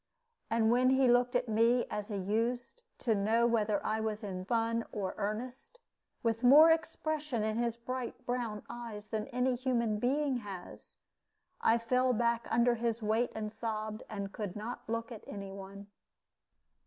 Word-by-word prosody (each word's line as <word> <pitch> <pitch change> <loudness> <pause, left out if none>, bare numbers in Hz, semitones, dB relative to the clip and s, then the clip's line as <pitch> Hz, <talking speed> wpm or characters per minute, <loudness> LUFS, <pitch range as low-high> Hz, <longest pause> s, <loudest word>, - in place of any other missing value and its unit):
And 225 0 +3
when 250 +1 +4
he 265 0 +4
looked 245 +1 +3
at 245 0 +1
me 230 +3 +3
as 210 -1 -3
he 210 - -4
used, 230 - -1 0.2
to 230 - +1
know 220 +3 +2
whether 215 -3 +1
I 220 0 0
was 220 -1 -2
in 185 -2 -5
fun 230 +1 +1
or 200 -3 -3
earnest, 240 - -5 0.4
with 225 -1 0
more 300 +6 +9
expression 310 -6 -1
in 215 0 -1
his 235 -1 0
bright 250 +1 -5
brown 235 -4 -2
eyes 230 -3 -7
than 215 -1 -2
any 250 +1 +1
human 235 -4 0
being 270 +2 +1
has, 195 -6 -9 0.6
I 225 - +4
fell 250 +2 +2
back 235 0 +1
under 240 +1 +4
his 230 -1 -2
weight 220 +3 +1
and 215 -1 -3
sobbed, 215 -1 -4
and 200 -2 -5
could 205 -4 -4
not 220 +2 -6
look 230 +1 -2
at 225 - -8
any 195 -1 -6
one. 195 +1 -9
230 Hz, 165 wpm, -32 LUFS, 215-245 Hz, 0.6 s, more